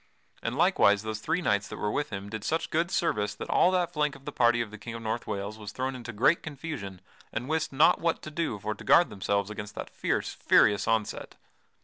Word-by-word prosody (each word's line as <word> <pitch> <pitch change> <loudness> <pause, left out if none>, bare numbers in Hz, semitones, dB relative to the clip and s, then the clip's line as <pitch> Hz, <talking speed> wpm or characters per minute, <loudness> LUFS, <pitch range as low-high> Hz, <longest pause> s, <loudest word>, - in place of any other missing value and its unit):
And 115 +3 -3
likewise 130 - +4
those 110 -1 -4
three 170 +10 -1
knights 105 -5 +1
that - - -7
were 105 - -1
with 145 +4 -1
him 100 -1 -6
did 110 0 -6
such 160 +7 -1
good 165 +2 +1
service 105 - 0
that - - -6
all - - +5
that 180 -2 0
flank 150 -2 0
of 135 0 -15
the 145 - -4
party 120 -3 +3
of 115 -3 -2
the 110 - -10
King 115 +2 -7
of 115 - -7
North 110 +2 -3
Wales 100 +2 -4
was 105 -1 -7
thrown 130 +3 -2
into 120 -2 -7
great 125 +10 +3
confusion 135 - -6 0.3
and 120 +3 -4
wist 160 +1 -1
not 140 +3 +4
what 165 -1 0
to 155 - -7
do 155 -8 -2
for 105 +2 -3
to 105 - -12
guard 175 - +5
themselves 100 +1 -1
against 105 0 -7
that - - -6
fierce, - - -1
furious 105 0 +3
onset. 110 -2 -1
115 Hz, 235 wpm, -28 LUFS, 105-155 Hz, 0.3 s, all